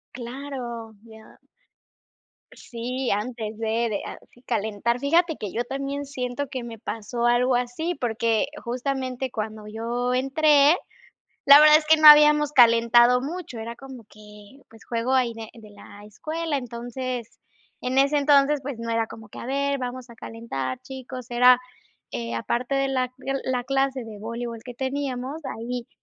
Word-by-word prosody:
Claro, 240 Hz, -2 st, -7 dB
ya. 220 Hz, -1 st, -16 dB, 1.1 s
Sí, 250 Hz, +2 st, -5 dB
antes 220 Hz, +1 st, -3 dB
de 225 Hz, +1 st, -1 dB
de 205 Hz, -2 st, -3 dB
a -, -, -7 dB, 0.3 s
calentar, 220 Hz, +1 st, -1 dB
fíjate 325 Hz, +4 st, +2 dB
que 205 Hz, -, -6 dB
yo 235 Hz, -, -2 dB
también 275 Hz, +2 st, -4 dB
siento 260 Hz, 0 st, -4 dB
que 255 Hz, -1 st, -6 dB
me 230 Hz, -1 st, -8 dB
pasó 230 Hz, +2 st, -4 dB
algo 245 Hz, +1 st, +3 dB
así, 250 Hz, +8 st, -2 dB
porque 230 Hz, -1 st, 0 dB, 0.2 s
justamente 255 Hz, +1 st, -3 dB
cuando 215 Hz, -1 st, -5 dB
yo 235 Hz, +3 st, -2 dB
entré, 285 Hz, +3 st, +4 dB, 0.7 s
la 280 Hz, +1 st, +10 dB
verdad 305 Hz, 0 st, +8 dB
es 310 Hz, -, -4 dB
que 315 Hz, +1 st, +5 dB
no 310 Hz, 0 st, +7 dB
habíamos 300 Hz, 0 st, +8 dB
calentado 240 Hz, 0 st, +5 dB
mucho, 295 Hz, -4 st, -6 dB
era 230 Hz, +1 st, -6 dB
como 260 Hz, -2 st, -12 dB
que, 210 Hz, +4 st, -16 dB
pues, 225 Hz, 0 st, -17 dB
juego 235 Hz, +2 st, -1 dB
ahí 250 Hz, -3 st, +2 dB
de 225 Hz, -1 st, -9 dB
de 220 Hz, -3 st, -14 dB
la 205 Hz, 0 st, -14 dB
escuela, 310 Hz, +8 st, -4 dB
entonces, 245 Hz, -1 st, -6 dB, 0.4 s
en 255 Hz, +1 st, -2 dB
ese 280 Hz, +2 st, +4 dB
entonces, 285 Hz, 0 st, +4 dB
pues, 270 Hz, -2 st, -6 dB
no 230 Hz, 0 st, -5 dB
era 230 Hz, 0 st, +1 dB
como 220 Hz, -1 st, -11 dB
que, -, -, -11 dB
a -, -, -7 dB
ver, 280 Hz, +2 st, -1 dB
vamos 255 Hz, -1 st, -6 dB
a 235 Hz, -, -13 dB
calentar, 135 Hz, -, -5 dB
chicos, 255 Hz, -2 st, -9 dB
era 250 Hz, +1 st, +6 dB, 0.8 s
aparte 245 Hz, -, -2 dB
de 275 Hz, 0 st, +1 dB
la 255 Hz, -1 st, 0 dB, 0.4 s
la 250 Hz, -1 st, -1 dB
clase 270 Hz, 0 st, 0 dB
de 220 Hz, -2 st, -10 dB
voleibol 230 Hz, +1 st, -5 dB
que 250 Hz, -, -9 dB
teníamos, 265 Hz, +2 st, -4 dB
ahí 235 Hz, +1 st, -5 dB
245 Hz, 155 wpm, -24 LUFS, 230-275 Hz, 1.1 s, la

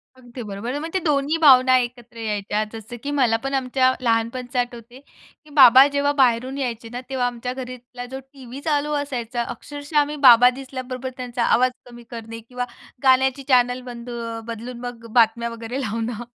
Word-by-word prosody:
अगदी 245 Hz, -1 st, -11 dB
बरोबर. 210 Hz, +6 st, -5 dB
म्हणजे 330 Hz, +4 st, -3 dB
ते -, -, -14 dB
दोन्ही 295 Hz, +1 st, +1 dB
भावना 260 Hz, -4 st, +6 dB
एकत्र 240 Hz, -1 st, -5 dB
यायच्या 210 Hz, -1 st, -2 dB
जसं 225 Hz, +2 st, -8 dB
की 285 Hz, -, -3 dB
मला 250 Hz, -6 st, +2 dB
पण 270 Hz, 0 st, -3 dB
आमच्या 260 Hz, 0 st, +2 dB
लहानपणच 240 Hz, +2 st, -1 dB
आठवते, 245 Hz, 0 st, -4 dB
की 300 Hz, +1 st, -24 dB
बाबा 260 Hz, 0 st, +9 dB
जेव्हा 285 Hz, 0 st, 0 dB
बाहेरून 255 Hz, +2 st, +2 dB
यायचे 235 Hz, -4 st, -4 dB
ना 245 Hz, -, -5 dB
तेव्हा 260 Hz, -2 st, 0 dB
आमच्या 245 Hz, +1 st, -4 dB
घरातला 250 Hz, -1 st, -8 dB
जो 265 Hz, -, -5 dB
टीव्ही 265 Hz, 0 st, -10 dB
चालू 295 Hz, -1 st, 0 dB
असायचा, 245 Hz, -5 st, -3 dB
अक्षरशः 290 Hz, +4 st, -3 dB
आम्ही 295 Hz, +1 st, 0 dB
बाबा 245 Hz, +1 st, +8 dB
दिसल्याबरोबर 255 Hz, 0 st, -6 dB
त्यांचा 245 Hz, -1 st, -3 dB
आवाज 255 Hz, +2 st, +3 dB, 0.2 s
कमी 240 Hz, 0 st, -12 dB
करणे 230 Hz, -1 st, -7 dB
किंवा 250 Hz, 0 st, -3 dB, 0.4 s
गाण्याची 265 Hz, +1 st, +3 dB
चॅनल 250 Hz, -1 st, +3 dB
बंद 245 Hz, -1 st, -9 dB
अ, 230 Hz, -1 st, -5 dB
बदलून 235 Hz, +2 st, -7 dB
मग 240 Hz, -2 st, -8 dB
अ, -, -, -9 dB
बातम्या 235 Hz, 0 st, +3 dB
वगैरे 230 Hz, +3 st, -5 dB
लावणं. 230 Hz, 0 st, -3 dB
250 Hz, 170 wpm, -22 LUFS, 235-265 Hz, 0.4 s, बाबा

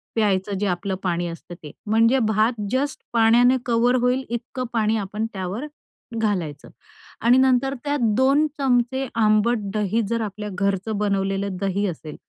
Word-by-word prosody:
प्यायचं 205 Hz, -2 st, +1 dB
जे 205 Hz, -, 0 dB
आपलं 190 Hz, +2 st, -2 dB
पाणी 175 Hz, -1 st, -1 dB
असतं 170 Hz, +1 st, -9 dB
ते. 150 Hz, -, -8 dB
म्हणजे 230 Hz, +4 st, +3 dB
भात 220 Hz, +2 st, +1 dB
जस्ट 275 Hz, +2 st, -1 dB
पाण्याने 235 Hz, +3 st, +5 dB
कव्हर 240 Hz, +1 st, +2 dB
होईल 250 Hz, +2 st, +1 dB
इतकं 245 Hz, +2 st, -4 dB
पाणी 220 Hz, -1 st, +1 dB
आपण 210 Hz, +2 st, -3 dB
त्यावर 190 Hz, +7 st, -4 dB, 0.5 s
घालायचं 180 Hz, -10 st, -2 dB, 0.5 s
आणि 240 Hz, +2 st, +5 dB
नंतर 265 Hz, +1 st, +3 dB
त्यात 290 Hz, -1 st, -1 dB, 0.2 s
दोन 275 Hz, +4 st, +4 dB
चमचे 260 Hz, 0 st, +1 dB
आंबट 215 Hz, +2 st, +3 dB, 0.2 s
दही 215 Hz, +1 st, 0 dB
जर 230 Hz, 0 st, 0 dB
आपल्या 210 Hz, 0 st, -5 dB
घरचं 200 Hz, +2 st, -1 dB
बनवलेलं 195 Hz, -1 st, -1 dB
दही 195 Hz, +1 st, 0 dB
असेल, 155 Hz, -3 st, -7 dB
215 Hz, 145 wpm, -23 LUFS, 195-245 Hz, 0.5 s, पाण्याने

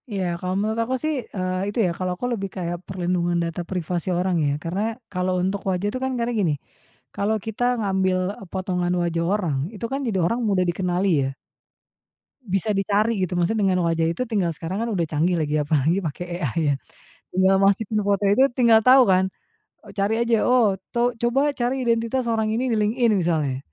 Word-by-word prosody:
Iya. 200 Hz, -3 st, -2 dB, 0.2 s
Kalau 185 Hz, 0 st, -2 dB
menurut 215 Hz, +3 st, -1 dB
aku 245 Hz, +3 st, -1 dB
sih, 310 Hz, 0 st, +1 dB, 0.2 s
eee, 185 Hz, -1 st, -1 dB
itu 205 Hz, -, -7 dB
ya, 175 Hz, -, +1 dB
kalau 185 Hz, -1 st, -2 dB
aku 245 Hz, -, -4 dB
lebih 195 Hz, -4 st, -3 dB
kayak 175 Hz, -2 st, -3 dB
perlindungan 175 Hz, -2 st, -1 dB
data 170 Hz, +1 st, -3 dB
privasi 180 Hz, -1 st, -2 dB
orang 180 Hz, +1 st, 0 dB
ya, 145 Hz, -, +1 dB
karena 175 Hz, +4 st, -2 dB, 0.3 s
kalau 185 Hz, 0 st, 0 dB
untuk 190 Hz, +2 st, -1 dB
wajah 185 Hz, +2 st, 0 dB
itu 255 Hz, -, -3 dB
kan, 265 Hz, -, 0 dB
karena 235 Hz, 0 st, -1 dB
gini. 195 Hz, -9 st, +1 dB, 0.6 s
Kalau 210 Hz, +2 st, 0 dB
kita 220 Hz, +2 st, -3 dB, 0.2 s
ngambil 190 Hz, -3 st, +1 dB, 0.2 s
e -, -, -9 dB
potongan 180 Hz, -2 st, -1 dB
wajah 170 Hz, -1 st, -1 dB
orang, 175 Hz, -9 st, 0 dB, 0.2 s
itu 210 Hz, -, -5 dB
kan 270 Hz, -, -1 dB
jadi 200 Hz, -5 st, 0 dB
orang 230 Hz, +8 st, 0 dB
mudah 190 Hz, -2 st, +2 dB
dikenali 180 Hz, +2 st, 0 dB, 0.2 s
ya. -, -, -3 dB, 1.1 s
Bisa 205 Hz, -1 st, -1 dB
dicari 205 Hz, +2 st, +1 dB
gitu, 180 Hz, -1 st, -1 dB
maksudnya 195 Hz, +3 st, +1 dB
dengan 180 Hz, -2 st, +1 dB
wajah 165 Hz, -1 st, +1 dB
itu 255 Hz, -, -1 dB
tinggal 205 Hz, -7 st, 0 dB
Sekarang 170 Hz, +5 st, -4 dB
kan 235 Hz, -, -1 dB
udah 185 Hz, -6 st, 0 dB
canggih 160 Hz, +3 st, 0 dB
lagi 150 Hz, -1 st, 0 dB
apalagi 155 Hz, +5 st, +1 dB
pakai 170 Hz, 0 st, -4 dB, 0.2 s
AI 145 Hz, 0 st, -1 dB
ya. -, -, -1 dB, 0.5 s
Tinggal 190 Hz, +1 st, +3 dB
masukin 205 Hz, +2 st, +2 dB
foto 200 Hz, 0 st, +1 dB
itu, 205 Hz, +6 st, +4 dB
tinggal 230 Hz, -3 st, +6 dB
tahu 255 Hz, +2 st, +7 dB
kan. 190 Hz, -1 st, +3 dB, 0.5 s
Oh -, -, -12 dB
cari 200 Hz, +2 st, 0 dB
aja, 230 Hz, -2 st, +2 dB
oh, 230 Hz, -6 st, +3 dB, 0.2 s
to 240 Hz, +1 st, +2 dB
"Coba 270 Hz, +5 st, +2 dB
cari 255 Hz, +2 st, -1 dB
identitas 235 Hz, +1 st, 0 dB
orang 220 Hz, -1 st, +1 dB
ini 250 Hz, +3 st, 0 dB
di 225 Hz, -, +1 dB
LinkedIn." 225 Hz, +3 st, +2 dB
Misalnya, 155 Hz, -7 st, 0 dB
195 Hz, 190 wpm, -23 LUFS, 175-225 Hz, 1.1 s, tahu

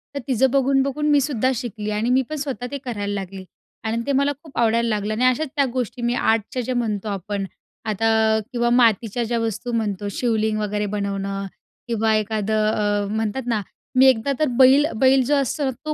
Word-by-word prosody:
तर -, -, -1 dB
तिचं 260 Hz, 0 st, +2 dB
बघून-बघून 275 Hz, +2 st, +1 dB
मी 290 Hz, -, +5 dB
सुद्धा 260 Hz, -2 st, 0 dB
शिकली 215 Hz, -3 st, -5 dB
आणि 230 Hz, +3 st, 0 dB
मी 260 Hz, +1 st, +4 dB
पण 310 Hz, -, -3 dB
स्वतः 275 Hz, -4 st, -4 dB
ते 280 Hz, -, -3 dB
करायला 205 Hz, -4 st, -3 dB
लागली 195 Hz, -1 st, -6 dB, 0.4 s
आणि 225 Hz, +1 st, -1 dB
ते -, -, +1 dB
मला 280 Hz, +2 st, +2 dB
खूप 310 Hz, -, -14 dB
आवडायला 230 Hz, 0 st, +2 dB
लागलं 210 Hz, 0 st, -1 dB
आणि 245 Hz, +4 st, +1 dB
अशाच 255 Hz, +5 st, +2 dB
त्या 280 Hz, -2 st, +3 dB
गोष्टी 250 Hz, -1 st, -3 dB
मी 240 Hz, +1 st, 0 dB
आर्टच्या 225 Hz, +3 st, 0 dB
ज्या 255 Hz, +2 st, -3 dB
म्हणतो 215 Hz, -3 st, -2 dB
आपण, 200 Hz, 0 st, -3 dB, 0.4 s
आता 220 Hz, +1 st, +2 dB
किंवा 240 Hz, -1 st, +1 dB
मातीच्या 230 Hz, +1 st, +2 dB
ज्या 235 Hz, +1 st, -1 dB
वस्तू 230 Hz, +2 st, -3 dB
म्हणतो. 205 Hz, -3 st, -2 dB
शिवलिंग 220 Hz, -1 st, 0 dB
वगैरे 210 Hz, 0 st, -1 dB
बनवणं 195 Hz, -1 st, -3 dB, 0.4 s
किंवा 220 Hz, -1 st, +1 dB
एखादं 215 Hz, 0 st, 0 dB
अ, 205 Hz, -1 st, 0 dB
म्हणतात 220 Hz, +4 st, -2 dB
ना, 225 Hz, -3 st, 0 dB, 0.3 s
मी 260 Hz, -, +6 dB
एकदा 255 Hz, +2 st, +1 dB
तर 310 Hz, -, +2 dB
बैल, 270 Hz, +3 st, +7 dB
बैल 265 Hz, +3 st, +4 dB
जो 290 Hz, +3 st, +2 dB
असतो 280 Hz, +1 st, 0 dB
ना 265 Hz, -, 0 dB
तो 305 Hz, -, -1 dB
230 Hz, 190 wpm, -22 LUFS, 210-260 Hz, 0.4 s, बैल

